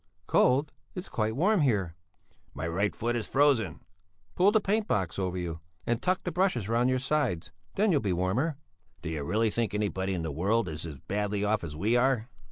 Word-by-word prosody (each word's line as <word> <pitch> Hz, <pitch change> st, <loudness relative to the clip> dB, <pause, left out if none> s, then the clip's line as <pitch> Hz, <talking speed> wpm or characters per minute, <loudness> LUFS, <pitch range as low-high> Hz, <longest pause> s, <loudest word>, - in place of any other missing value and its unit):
"Cold? 140 Hz, +7 st, +3 dB, 0.2 s
It's 180 Hz, -, -6 dB
quite 110 Hz, 0 st, -1 dB
warm 190 Hz, +6 st, +3 dB
here." 100 Hz, -, +1 dB, 0.6 s
"My 80 Hz, -, -3 dB
right 100 Hz, +5 st, 0 dB
foot 120 Hz, +1 st, -1 dB
is 115 Hz, -3 st, -2 dB
frozen." 135 Hz, -, +2 dB, 0.5 s
"Pull 195 Hz, +3 st, +4 dB
the 220 Hz, -, +4 dB
paint 210 Hz, +1 st, 0 dB
box 95 Hz, -2 st, -1 dB
over 90 Hz, -1 st, -1 dB
you, 85 Hz, -2 st, -4 dB, 0.3 s
and 120 Hz, 0 st, 0 dB
tuck 185 Hz, 0 st, 0 dB
the 180 Hz, -, -2 dB
brushes 175 Hz, -, +1 dB
round 120 Hz, +3 st, +2 dB
your 130 Hz, -, +2 dB
sides, 135 Hz, -, -1 dB, 0.2 s
then 210 Hz, +1 st, +3 dB
you'll 145 Hz, -5 st, +3 dB
be 100 Hz, -, 0 dB
warmer." 100 Hz, -, 0 dB, 0.5 s
"Do -, -, -3 dB
you 95 Hz, +9 st, 0 dB
think 115 Hz, -2 st, -1 dB
anybody 95 Hz, -2 st, -1 dB
in 85 Hz, -, -3 dB
the 80 Hz, -, -3 dB
world 100 Hz, +8 st, +1 dB
is 80 Hz, 0 st, -5 dB
as 75 Hz, -, -7 dB
badly 105 Hz, 0 st, -1 dB
off 105 Hz, -1 st, +1 dB
as 75 Hz, -3 st, -6 dB
we 105 Hz, +9 st, +1 dB
are?" 125 Hz, -2 st, +2 dB
110 Hz, 195 wpm, -29 LUFS, 95-140 Hz, 0.6 s, Pull